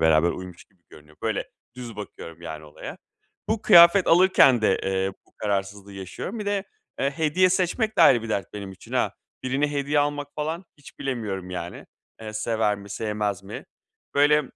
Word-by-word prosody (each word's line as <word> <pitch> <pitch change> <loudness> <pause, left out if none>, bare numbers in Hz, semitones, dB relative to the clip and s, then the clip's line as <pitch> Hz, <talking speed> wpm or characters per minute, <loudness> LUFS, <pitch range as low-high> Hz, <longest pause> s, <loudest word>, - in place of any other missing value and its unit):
beraber 80 +1 +4
uymuş 90 -1 -8
gibi 95 -3 -37
görünüyor. 75 0 -17
Böyle - - -2 0.3
düz 120 -4 -8
bakıyorum 85 -5 -9
yani 80 -2 -7
olaya. 75 - -9 0.5
Bu 220 0 0
kıyafet 175 -1 +8
alırken 165 -9 +6
de, 95 - +3
eee, 95 0 0
bu - - -30
kararsızlığı 100 -1 -3
yaşıyorum. 95 - -6
Bir 210 - -5
de, 200 -1 0 0.4
eee, 140 - +2
hediye 160 +5 +2
seçmek 190 +5 0
de - - +8
ayrı 120 -4 +6
bir 115 - -6
dert 100 -4 -2
benim 100 -2 -6
için 95 - -14
ha. - - +1 0.3
Birine 140 +3 0
hediye 145 +1 0
almak 145 0 -1
falan 160 +4 -3
hiç 145 - -15
bilemiyorum 105 -8 -4
yani. 90 -1 -6 0.3
Eee, 110 -1 -7
sever 110 -1 0
mi 100 0 -12
sevmez 105 -2 -2
mi? 100 +2 -8 0.5
Böyle, 150 +1 +5
110 Hz, 175 wpm, -25 LUFS, 95-150 Hz, 0.5 s, kıyafet